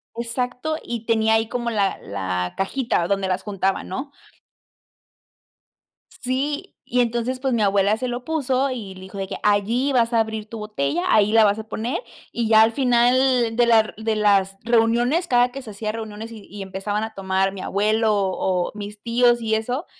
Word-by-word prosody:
exacto, 250 +5 -2
y 235 -1 -5
tenía 220 -1 +3
ahí 225 0 +1
como 240 -1 -2
la 205 -4 0
la 95 -2 -3
cajita 195 -3 0
donde 195 -1 0
las 185 0 -1
juntaba, 195 -2 -1
¿no? 265 +10 -5 2.0
Sí, 285 +8 -3
y 250 0 +1
entonces, 240 +2 -1
pues 265 -2 0
mi 230 - +1
abuela 200 +1 +3
se 255 +2 -3
lo 245 +1 -4
puso, 275 -3 0
y 205 -7 -6
le 185 - -12
dijo 190 +1 -10
de 195 -1 -3
que: - - -5
"Allí 220 +7 +2
vas 235 -1 +2
a 230 - +4
abrir 220 -1 -4
tu 230 - -7
botella, 175 -7 -2
ahí 210 0 +4
la 225 -1 +6
vas 205 +1 +2
a 220 - -6
poner", 230 +4 -3 0.3
y 235 -1 -1
ya 220 0 +6
al 225 +1 +5
final 245 -1 +3
de 240 0 +4
la 230 -1 +6
r 215 - -8
de 220 0 -1
las 195 -2 +2
reuniones, 240 +8 +2
cada 245 0 +3
que 275 - -7
se 225 -5 -9
hacía 215 +1 -3
reuniones, 220 0 -7
y 215 -3 -11
y 205 0 -8
empezaban 195 +2 -3
a 220 0 -5
tomar 190 0 0
mi 195 - -8
abuelo, 215 +3 +1
o 185 -2 0
mis 210 0 -8
tíos 240 0 +3
y 220 -1 +1
eso, 245 +8 -2
220 Hz, 190 wpm, -22 LUFS, 200-245 Hz, 2.0 s, la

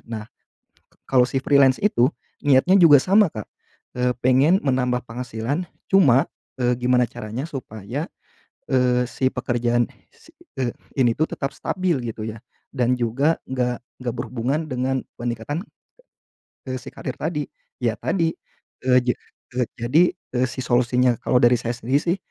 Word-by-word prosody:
Nah, 110 -2 -5 0.8
kalau 125 -2 +4
si 135 - -1
freelance 135 -2 +4
itu, 145 - +3 0.3
niatnya 145 +6 +5
juga 155 -5 +8
sama 200 +1 +5
Kak, 110 -2 -7 0.5
eee, 125 0 +2
pengen 135 +9 +4
menambah 125 -2 +1
penghasilan, 125 +6 -3 0.3
cuma, 145 -6 +5 0.3
eee, 125 0 +2
gimana 125 0 +3
caranya 115 +7 -5
supaya, 120 0 -5 0.7
eee, 125 -1 +3
si 130 +2 0
pekerjaan 120 -1 0 0.2
si - - -21 0.3
eee, 120 -2 -1 0.3
ini 120 -3 +4
tuh 155 - +3
tetap 135 -1 -3
stabil 185 -5 0 0.2
gitu 110 - -9
ya. 110 0 -6 0.3
Dan 125 -2 +1
juga 135 +8 +1
enggak 125 -2 -1 0.2
enggak 120 -2 -2
berhubungan 125 +5 -2
dengan 130 +1 -1 0.2
peningkatan, 120 - -3 1.0
eee, 130 - -2
si 135 - -10
karier 130 - -5
tadi. 150 -2 -2 0.4
Ya 115 -2 +1
tadi, 165 -3 0 0.5
eee, 125 -1 +5
jad 125 - +1 0.4
eee, 125 -2 +1
jadi, 125 +9 +3 0.3
eee, 130 +1 +3
si 130 - -10
solusinya, 125 0 +3
kalau 125 - +3
dari 120 +1 +6
saya 120 0 -4
sendiri 130 +5 +1
sih 175 +2 +1
125 Hz, 145 wpm, -23 LUFS, 120-140 Hz, 1.0 s, juga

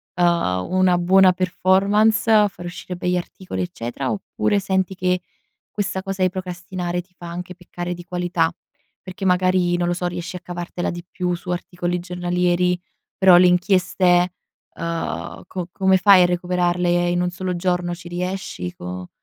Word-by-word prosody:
uhm, 170 - +1
una 185 -1 +3
buona 185 +1 +5
performance, 195 +5 +2
a 210 -1 +6
far 175 -3 -10
uscire 180 +1 -6
begli 180 0 0
articoli, 180 +1 -5
eccetera. 135 -7 -4
Oppure, 205 0 -1
senti 190 -1 -1
che, 180 0 0 0.5
questa 190 -2 -2
cosa 195 -1 -4
di 185 - +4
procrastinare 180 -1 -4
ti 180 +1 -29
fa 175 - -9
anche 180 +1 -6
peccare 175 -1 -6
di 175 - -10
qualità? 175 -1 0 0.5
Perché 185 +1 -7
magari 180 -1 +3
non 175 0 0
lo 175 - +1
so, 180 0 -3
riesci 175 0 -4
a - - -9
cavartela 175 0 -4
di 175 0 -7
più 180 -1 -2
su 175 +1 -7
articoli 175 0 -2
giornalieri, 180 0 0 0.4
però 190 -2 +7
le 180 +1 +7
inchieste, 180 -1 +3 0.4
uhm - - -11 0.7
co 180 -2 -5
come 190 +1 +3
fai 190 -1 +7
a - - +5
recuperarle 175 0 +1
in 175 0 +1
un 180 - +1
solo 180 0 -3
giorno? 175 -1 -1
Ci 175 0 -12
riesci 175 - -4
co 90 0 -7
180 Hz, 160 wpm, -21 LUFS, 175-185 Hz, 0.7 s, però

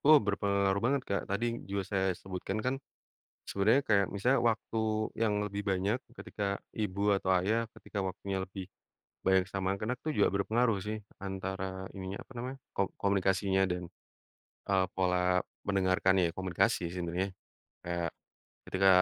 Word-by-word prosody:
Oh 155 +1 +10
berpengaruh 100 -1 +2
banget 140 +2 +2
Kak, 100 - +1
tadi 100 +4 0 0.2
juga 100 0 -1
saya 95 -1 +2
sebutkan 95 +1 -4
kan 130 +1 +2 0.7
sebenernya 110 +7 +4
kayak 100 -2 +5
misalnya 125 +7 +3
waktu 110 0 -4 0.5
yang 110 -2 +3
lebih 100 0 -3
banyak, 95 +5 +1 0.2
ketika 105 - -4 0.3
ibu 100 -3 -2 0.2
atau 95 -1 -1
ayah 110 +5 +2
ketika 100 - -7
waktunya 95 +1 -4
lebih 95 0 -7 0.6
banyak 95 -1 +5
sama 95 -1 -2
anak-anak 105 +6 -2
itu 155 - -1
juga - - +6
berpengaruh 110 +2 +2
sih 110 +1 -1 0.3
antara 95 -1 -4
ininya 95 +1 -4
apa - - -22
namanya, 125 +3 -4 0.2
ko - - +2 0.2
komunikasinya 95 -1 +2
dan, 90 0 -2 0.9
eee, 95 -1 +4
pola 90 -1 +3 0.5
mendengarkanya 95 -2 +3
komunikasi 95 -2 +2
sebenarnya, 90 +2 -1 0.6
eee, 85 -1 0 0.6
ketika 95 +1 +3
95 Hz, 140 wpm, -32 LUFS, 95-105 Hz, 0.9 s, Oh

